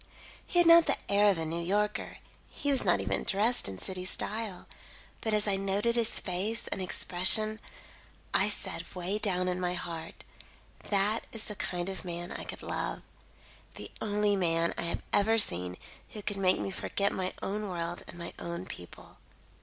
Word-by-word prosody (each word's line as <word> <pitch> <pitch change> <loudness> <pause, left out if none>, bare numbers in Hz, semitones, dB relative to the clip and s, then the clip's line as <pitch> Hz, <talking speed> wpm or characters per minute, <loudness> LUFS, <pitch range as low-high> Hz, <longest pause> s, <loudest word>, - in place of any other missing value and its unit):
He - - -2
had 350 -1 +6
not 335 0 +8
the - - +2
air 205 +1 +6
of 195 - +3
a 165 - -1
New 165 +2 -2
Yorker; 205 +4 0 0.3
he 285 - -2
was 270 - +2
not - - +3
even 95 0 -1
dressed 215 - +2
in 95 - -6
city 185 - -3
style, 210 +1 -3 0.6
but 220 - 0
as 210 0 +2
I 195 -1 +2
noted 200 +4 +1
his 235 -2 +1
face 200 +5 -2
and 195 - -3
expression, 200 +4 +2 0.7
I - - +4
said - - -3
way 185 +4 -1
down 185 -3 0
in 180 0 0
my 180 0 0
heart, 165 -2 -6 0.7
'That 205 +2 +2
is 225 -1 -4
the 210 - -5
kind 175 -2 -2
of 190 -1 -5
man 175 0 -5
I - - -5
could - - -6
love; - - -3 0.7
the - - -8
only 210 -1 +2
man 170 -3 +1
I - - -3
have 170 - -3
ever 220 +3 +4
seen 90 - +4 0.3
who 210 - -8
could 205 -1 -2
make 185 -1 +3
me 195 - -3
forget 200 +1 0
my 185 -1 -2
own 210 +1 -2
world 175 -1 -3
and - - -10
my 170 0 -6
own 170 +1 -4
people. 90 - -11
195 Hz, 185 wpm, -30 LUFS, 175-210 Hz, 0.7 s, not